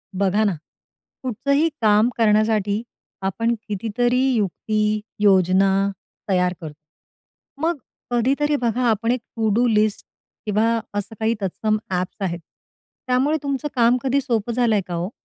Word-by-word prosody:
बघा 200 +2 +2
ना. 200 -3 +2 0.7
कुठलंही 280 +6 +1
काम 215 +2 +4
करण्यासाठी 215 -2 +2 0.4
आपण 225 +5 0
कितीतरी 230 +4 0 0.2
युक्ती, 215 +1 0 0.2
योजना 190 -1 +4 0.6
तयार 180 -1 +2
करतो. 155 -2 -7 0.9
मग 330 0 +1 0.3
कधीतरी 275 +5 +1
बघा 245 -2 0
आपण 225 +1 +1
एक 250 - 0 0.2
टू 220 -2 +1
डू 240 +2 +3
लिस्ट 215 -2 +1 0.4
किंवा 220 +2 +2 0.2
असं 205 +2 -4
काही 225 +1 +1
तत्सम 215 +3 0
ॲप्स 180 0 -2
आहेत. 175 -3 -2 0.7
त्यामुळे 265 +5 +2
तुमचं 280 +1 -2
काम 240 0 +4
कधी 275 +1 +1
सोपं 235 -4 -1
झालंय 225 -4 +2
का 175 - -4
ओ? 175 +3 -2
220 Hz, 130 wpm, -22 LUFS, 200-245 Hz, 0.9 s, काम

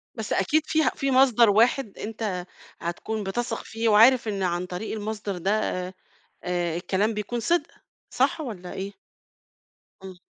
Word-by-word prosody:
بس 220 -3 -3
أكيد 300 +11 +2
فيها 315 -5 +2
في 275 0 -1
مصدر 250 -4 +5
واحد 230 +1 +2
أنت 210 -5 -4 0.3
هتكون 210 +5 -4
بتثق 225 +4 -3
فيه 225 0 -1
وعارف 230 +3 +6
إن 200 -3 -2
عن 175 0 -1
طريق 180 +5 -5
المصدر 210 -2 -4
ده 190 +3 0
آآ، 185 -2 -3 0.5
آآ 175 -2 -1
الكلام 200 +5 0
بيكون 210 +3 -3
صِدق، 335 +7 +1 0.4
صح - - +1
والّا 195 -10 -7
إيه؟ 195 +1 -5 1.1
امم. 185 -2 -10
210 Hz, 145 wpm, -25 LUFS, 185-235 Hz, 1.1 s, وعارف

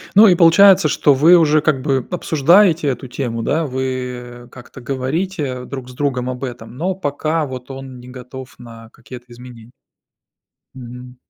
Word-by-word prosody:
Ну 215 +3 +8
и 185 - +5
получается, 175 0 +5
что 145 0 +2
вы 160 +7 +6
уже, 155 -2 +3
как 150 -5 0
бы, 135 -3 -1
обсуждаете 170 0 +2
эту 130 0 -4
тему, 120 -3 -4
да? 160 +8 -1
Вы 125 -2 -5
как-то 130 +1 -13
говорите 135 +1 -3
друг 130 -2 -8
с 125 - -12
другом 130 -2 -2
об 130 +1 -5
этом, 120 -2 -9
но 180 +7 -2
пока 155 -1 -2
вот 130 -1 -9
он 135 -1 -9
не 125 0 -13
готов 130 +1 -11
на 115 -2 -13
какие-то 125 0 -13
изменения? 120 -1 -14 1.0
Мгм. 125 0 -11
130 Hz, 160 wpm, -18 LUFS, 125-155 Hz, 1.0 s, Ну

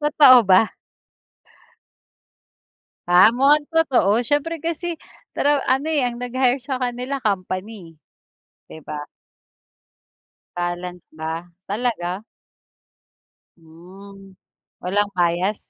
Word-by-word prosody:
Totoo 295 -4 +7
ba? 190 +4 +4 2.3
Ah, 185 +6 +6
mukhang 290 +3 +3
totoo 250 - +2
siyempre 295 +5 -1
kasi 335 +1 -3 0.4
pero, 290 0 +2
ano, 270 +4 +1
eh, 285 -5 +1
ang 240 - -5
nag-hire 255 +1 0
sa 265 -2 -4
kanila 250 +2 -3
company, 185 -4 -4 0.7
'di - - -10
ba? 150 -1 -6 1.5
Balance 175 0 -5
ba? 160 +2 -6 0.2
Talaga? 205 -4 -3 1.3
Hmm, 190 +4 -15 0.5
walang 205 +3 0
bias? 180 +3 -1
215 Hz, 90 wpm, -21 LUFS, 180-265 Hz, 2.3 s, Totoo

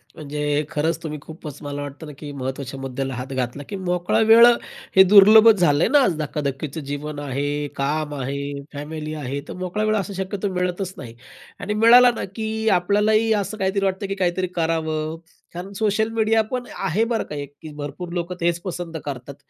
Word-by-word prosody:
म्हणजे 150 0 -2
खरंच 160 +1 0
तुम्ही 155 -2 -4
खूपच 155 -2 -9
मला 145 -1 -5
वाटतं 145 +2 -8
ना, 150 - -9
की 150 -2 -7
महत्त्वाच्या 135 0 -5
मुद्द्याला 135 0 -4
हात 125 +2 -6
घातला, 130 +2 -3
की - - -4
मोकळा 180 -1 0
वेळ 230 +1 +9
अ, - - +8 0.4
हे 190 - +9
दुर्लभच 210 +3 +8
झालंय 150 -3 +3
ना, 290 - +5
आज 180 - +1
धकाधकीचं 150 0 -3
जीवन 145 +1 -4
आहे, 145 +1 -2
काम 150 +2 -1
आहे, 140 +1 -4
फॅमिली 155 +1 -6
आहे, 140 -2 -4
तर - - -6
मोकळा 185 +3 -3
वेळ 215 0 +2
असं 200 0 -3
शक्यतो 190 +1 -3
मिळतच 180 +1 -2
नाही 120 -7 -9 0.4
आणि 210 - -3
मिळाला 240 +3 +7
ना, - - -4
की 220 0 -3
अ, - - +4
आपल्यालाही 210 +5 +2
असं 210 +1 -2
काहीतरी 195 0 0
वाटतं, 190 +1 -1
की 195 - -3
काहीतरी 185 -1 0
करावं 160 -1 -1 0.4
कारण 180 +3 -7
सोशल 215 +1 0
मीडिया 225 0 +3
पण 250 -1 -3
आहे 200 +8 0
बरं 225 - +1
का 150 - -5
एक 145 -1 -6
ते 155 - -7
भरपूर 150 +4 -6
लोकं 175 0 -3
तेच 170 0 +1
पसंत 175 -3 -5
करतात. 140 -1 -6
165 Hz, 190 wpm, -22 LUFS, 145-200 Hz, 0.4 s, वेळ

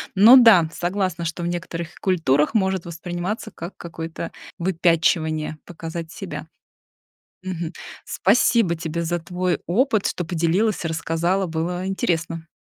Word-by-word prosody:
Но 220 +7 +9
да, 215 -10 +7
согласна, 180 -2 -2
что 165 +1 -3
в - - -1
некоторых 170 -1 -4
культурах 150 -5 +2
может 190 -5 +1
восприниматься 175 +6 -4
как 170 +3 -8
какое-то 165 -1 -6 0.3
выпячивание, 165 -3 +1
показать 165 -1 -7
себя. - - -7 0.9
Мгм. 175 -3 -4 0.3
Спасибо 205 -2 +3
тебе 165 0 -3
за 175 +1 -1
твой 180 +1 -1
опыт, 220 +2 +1
что 175 - -3
поделилась, 175 +6 +1
рассказала, 165 +4 0
было 175 +3 -2
интересно. 165 -3 -2
175 Hz, 120 wpm, -22 LUFS, 165-185 Hz, 0.9 s, Но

